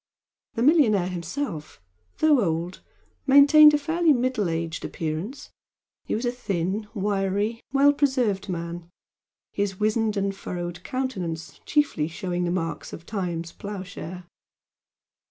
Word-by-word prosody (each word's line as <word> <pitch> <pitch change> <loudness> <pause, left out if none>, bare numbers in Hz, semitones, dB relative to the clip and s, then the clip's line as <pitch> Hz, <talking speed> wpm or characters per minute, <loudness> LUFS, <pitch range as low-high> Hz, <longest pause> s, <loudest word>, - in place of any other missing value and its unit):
The 230 - 0
millionaire 235 - +4
himself, 170 - -5 0.4
though 300 -5 +4
old, 170 +1 -2 0.5
maintained 295 +2 +8
a - - +3
fairly 320 +2 +2
middle 245 -6 0
aged 165 0 -3
appearance 165 - -5 0.5
he - - -1
was 230 +3 -2
a 240 - +1
thin, 200 -3 -2
wiry, 200 +2 -1
well 280 +1 +5
preserved 250 -9 0
man, 170 -1 -5 0.6
his 200 -2 -2
wizened 215 0 +1
and 195 0 -1
furrowed 175 -1 -6
countenance 185 -12 -4
chiefly 290 - +1
showing 175 +1 -3
the - - -1
marks 165 -2 -3
of 170 - -9
Time's 175 -5 -3
ploughshare. 185 -3 -7
200 Hz, 120 wpm, -25 LUFS, 175-255 Hz, 0.6 s, maintained